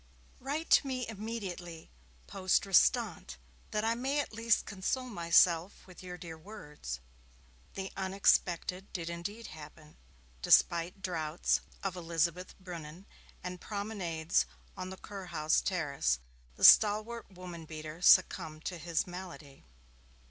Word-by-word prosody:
Write 290 +5 -4
to 280 - +6
me 255 -2 -2
immediately 195 -6 -6 0.3
Poste 185 0 +1
Restante, 195 - +2 0.3
that 210 - -1
I 225 +1 +2
may 265 +5 -1
at 285 - -3
least 230 0 +2
console 205 +6 -2
myself 170 0 +3
with 185 -2 -13
your 180 -1 -7
dear 165 -2 -9
words.' 150 - -8 0.8
The 195 0 -5
unexpected 190 -1 +1
did 170 -2 -4
indeed 200 +7 -6
happen. 150 0 -13 0.4
Despite 170 - +3
draughts 165 -3 0 0.2
of 195 -2 -2
Elizabeth 170 +1 -1
brunnen 175 -1 -9 0.4
and 180 0 -6
promenades 190 -6 -1 0.3
on 185 0 -5
the 190 - -8
Kurhaus 185 -7 -1
terrace, 140 - 0 0.4
the - - -9
stalwart 215 +2 +6
woman 180 -3 -9
beater 155 +1 -8
succumbed 160 -3 +4
to 180 -2 -4
his 170 0 -1
malady. 175 - -10
180 Hz, 120 wpm, -32 LUFS, 165-200 Hz, 0.8 s, to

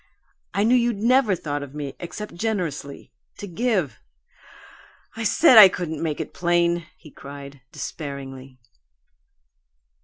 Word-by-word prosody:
I 200 - +2
knew 230 +3 +3
you'd 240 -3 +2
NEVER 235 -1 +3
thought 145 -4 -4
of 140 0 -9
me 145 -2 -5
except 210 +4 -7
generously 170 -8 -4 0.2
to - - -7
give. 190 - -1 1.2
I 225 - -5
said 235 - +6
I 200 -3 +11
couldn't 160 -4 -5
make 155 -3 -2
it - - -5
plain!" 175 -1 +1
he 155 - -16
cried, 140 -1 -11
despairingly. 135 -3 -8
170 Hz, 125 wpm, -23 LUFS, 145-210 Hz, 1.2 s, I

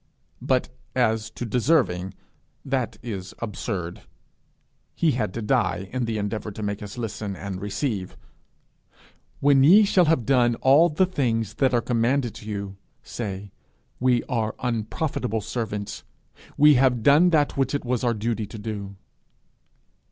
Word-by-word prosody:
But 130 -1 +1 0.3
as 110 -3 +1
to 115 +2 -6
deserving, 110 - +1 0.5
that 130 -3 -2
is 100 -6 -6
absurd: 100 -5 -4 0.9
he 165 - +2
had 110 -6 -1
to 115 - -3
die 95 -2 0
in 130 -2 -1
the 115 -1 -2
endeavour 105 +1 -3
to 105 - -6
make 100 0 -3
us 105 +2 -8
listen 105 -3 -4
and 95 0 -6
receive. 100 -1 -3 1.2
'When 140 -1 +5
ye 190 +9 +8
shall 190 -3 +4
have 155 -7 +2
done 120 -2 +3
all 140 +8 +5
the 170 +5 +2
things 115 - -1
that 130 +3 +2
are 120 - +2
commanded 120 +1 0
you, 100 -2 -5 0.3
say, 100 -3 -6 0.5
We 125 -1 +2
are 110 -4 -2
unprofitable 115 0 -2
servants; 105 -2 -4 0.5
we 150 +1 +7
have 125 -3 +3
done 150 +7 +6
that 150 -4 +2
which 135 +1 0
it 140 - -3
was 125 -1 -1
our 120 -2 +1
duty 110 0 -2
to 110 - -9
do.' 100 -2 -6
115 Hz, 145 wpm, -24 LUFS, 105-130 Hz, 1.2 s, ye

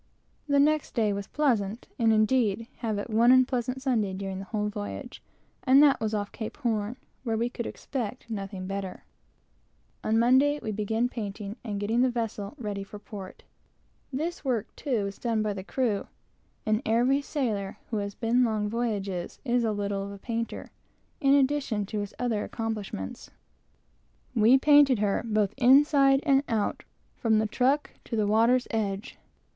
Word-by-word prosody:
The 285 -1 +3
next 300 +1 +2
day 215 -4 +2
was 200 0 -4
pleasant, 230 -7 0
and 225 -1 +4
indeed 215 -1 +3
we 230 +2 -11
had 225 -3 -2
but 205 +3 -4
one 230 +3 +5
unpleasant 255 0 +2
Sunday 220 -8 +1
during 190 -1 -4
the 195 - -7
whole 210 +1 -2
voyage, 100 - -6 0.4
and 270 +3 +6
that 280 -3 +5
was 220 -1 -1
off 205 -1 -3
Cape 220 - -6
Horn, 230 -3 -1 0.3
where 225 -3 -1
we 235 +2 -1
could 235 - -4
expect 250 -3 -5
nothing 195 -4 -5
better. 195 -1 -5 1.0
On 220 +1 +2
Monday 260 +5 +4
we 215 - -4
commenced 220 +4 -1
painting, 205 -2 -5
and 210 -4 -3
getting 220 +4 +1
the 255 - +4
vessel 225 -3 -4
ready 205 -5 -4
for 195 +1 -10
port. 205 -2 -10 0.7
This 315 +6 -3
work, 245 -6 -2
too, 240 -8 -1
is 200 0 -6
done 225 -3 0
by 210 -1 -1
the 190 -1 -6
crew, 220 -2 -1 0.6
and 215 +1 +1
every 245 +5 +2
sailor 225 -10 -2
who 220 - 0
has 200 -1 -3
been 240 +2 +2
long 215 -3 0
voyages 205 -6 -3
is 245 -1 +2
a 225 - +1
little 200 -1 -2
of 200 - -6
a 200 - -8
painter, 230 +2 -4 0.5
in 275 -1 +4
addition 270 -6 +1
to 210 +2 -4
his 205 -1 -5
other 230 -4 -1
accomplishments. 210 - -5 1.0
We 235 +2 +6
painted 290 -2 +6
her, 205 -1 +1
both 215 -4 0
inside 275 +1 +5
and 275 -3 +4
out, 220 -3 -1 0.3
from 225 -3 +2
the 215 - +2
truck 265 +7 +1
to 230 - -4
the 215 -2 +2
water's 230 +4 +3
edge. 210 0 -3
225 Hz, 170 wpm, -27 LUFS, 205-255 Hz, 1.0 s, and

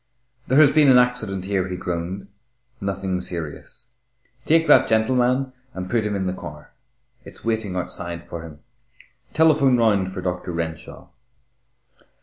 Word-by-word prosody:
"There 130 - +2
has 150 -2 +7
been 150 -3 +5
an 130 - +7
accident 115 -7 +1
here," 95 -2 -1
he 90 -1 -5
groaned, 90 +2 -4 0.5
"nothing 95 -2 -2
serious. 85 -4 -7 0.6
Take 165 +1 +4
that 150 - +6
gentleman 125 +3 +1 0.2
and 90 0 -6
put 115 -2 +2
him 105 -1 -2
in 95 -1 -2
the 90 - -1
car. 75 -5 -10 0.5
It's - - -13
waiting 110 -4 -1
outside 85 -1 -4
for 85 - -6
him. 80 -2 -12 0.7
Telephone 150 -5 +4
round 100 -5 +2
for 95 -1 -6
Doctor 90 -1 -3
Renshaw." 80 -2 -6
95 Hz, 140 wpm, -22 LUFS, 90-125 Hz, 0.7 s, has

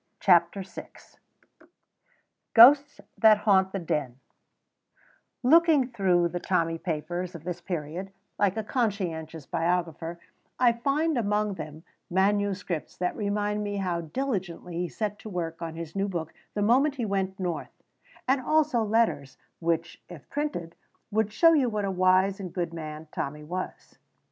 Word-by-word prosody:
CHAPTER 175 +1 +4
VI 190 - -9 1.7
GHOSTS 275 +5 +7 0.2
THAT 220 -2 +7
HAUNT 195 -3 +3
THE 195 - -2
DEN 150 -8 -2 1.2
Looking 305 -1 +5
through 185 -7 +2
the 175 - -4
Tommy 165 -3 0
papers 175 +2 -3
of 165 - -9
this 175 0 -5
period, 170 +2 -5 0.3
like 200 +1 +2
a 220 - -1
conscientious 175 - -2
biographer, 170 0 -2 0.4
I 245 -2 +5
find 280 +4 0
among 210 -1 0
them 155 -2 -8 0.3
manuscripts 190 -2 0
that 180 0 -1
remind 210 0 -1
me 205 0 -3
how 180 -3 -1
diligently 180 - -4
he 175 +1 -2
set 210 -2 -3
to 220 - -9
work 170 -3 -4
at 165 -1 -5
his 165 0 -7
new 195 +1 0
book 170 -4 -4 0.2
the 205 - 0
moment 265 +7 +3
he 245 -4 -2
went 195 -2 -2
North, 180 -3 -4 0.4
and 265 +1 +3
also 305 -3 +2
letters 210 - 0 0.2
which, 165 0 -2
if 175 -6 -11
printed, 280 - -3 0.4
would 215 0 +1
show 330 +10 +5
you 275 -6 +3
what 210 -2 -2
a 195 - -1
wise 185 +1 +3
and 185 -3 -6
good 175 -3 -2
man 155 -1 -7
Tommy 150 +2 -4
was. 180 +4 -6
190 Hz, 145 wpm, -27 LUFS, 170-215 Hz, 1.7 s, GHOSTS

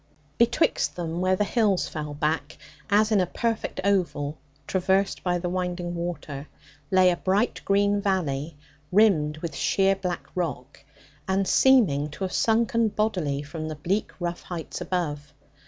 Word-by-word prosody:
Betwixt 240 +7 +2
them, 170 0 -3
where 185 0 +3
the 210 - +1
hills 210 -3 +1
fell 150 -2 -5
back, 150 0 -1 0.3
as 210 +2 +3
in 205 -3 +4
a 180 - 0
perfect 230 +3 -2
oval, 175 -7 0 0.3
traversed 190 +1 +1
by 180 -1 +1
the 175 0 -3
winding 180 -1 -2
water, 170 -4 -5 0.4
lay 185 -1 +5
a - - 0
bright 195 +7 0
green 200 +1 +2
valley, 165 -6 -1 0.3
rimmed 175 -7 +4
with 170 - -3
sheer 195 0 +2
black 180 -2 -4
rock, 145 -6 -4 0.4
and 190 0 +1
seeming 190 - +4
to 170 - -7
have 185 - -3
sunken 230 0 +2
bodily 180 -10 -1
from 155 +2 -6
the 155 - -4
bleak 180 +8 -1
rough 175 -1 -3
heights 170 -3 -6
above. 150 -5 -3
180 Hz, 150 wpm, -26 LUFS, 155-200 Hz, 0.4 s, lay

